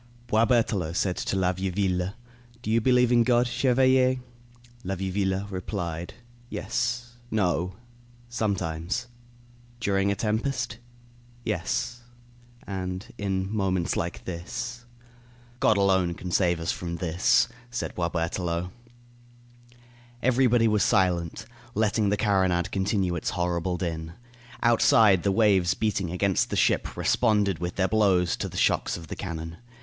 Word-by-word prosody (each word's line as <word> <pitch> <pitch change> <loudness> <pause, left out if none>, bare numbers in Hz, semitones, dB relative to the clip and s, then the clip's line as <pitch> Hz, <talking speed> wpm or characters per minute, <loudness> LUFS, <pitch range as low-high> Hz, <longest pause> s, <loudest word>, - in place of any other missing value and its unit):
Boisberthelot 110 -7 +2
said 90 -1 +1
to - - -2
La 95 -1 +2
Vieuville: 95 0 -1 0.5
"Do 110 - -2
you 115 +1 +3
believe 125 0 +4
in 120 -1 +5
God, 120 0 +3
chevalier?" 130 +1 +3 0.7
La 95 -1 -2
Vieuville 95 +1 -1
replied: 90 -3 -4 0.3
"Yes 120 +2 -3
no. 90 -4 0 0.5
Sometimes." 100 -2 -2 0.7
"During 100 -2 +1
a - - 0
tempest?" 115 +2 -2 0.7
"Yes, 110 +4 -2 0.6
and 95 0 -5
in 95 0 -2
moments 95 -4 0
like 85 +1 -3
this." 115 +7 -5 0.7
"God 110 - +4
alone 95 -3 +2
can 90 +1 -6
save 90 -2 +2
us 80 +1 -1
from 85 -1 -4
this," 85 +6 +2 0.2
said 120 0 -4
Boisberthelot. 85 +1 -2 1.5
Everybody 125 -2 +4
was 105 -1 +2
silent, 90 -6 +1 0.3
letting 105 -1 +2
the 105 - +1
carronade 95 -4 +1
continue 95 -2 0
its 85 - -2
horrible 90 0 -1
din. 80 -2 -4 0.5
Outside, 110 -4 +5
the 100 - +1
waves 95 -5 +3
beating 105 -5 -1
against 95 +2 +1
the - - -2
ship - - +1
responded 105 -6 +2
with 90 0 -4
their 95 -1 +2
blows 95 -5 +3
to - - -3
the - - -8
shocks - - +1
of 85 - -9
the - - -6
cannon. 80 -2 -6
95 Hz, 125 wpm, -26 LUFS, 90-110 Hz, 1.5 s, in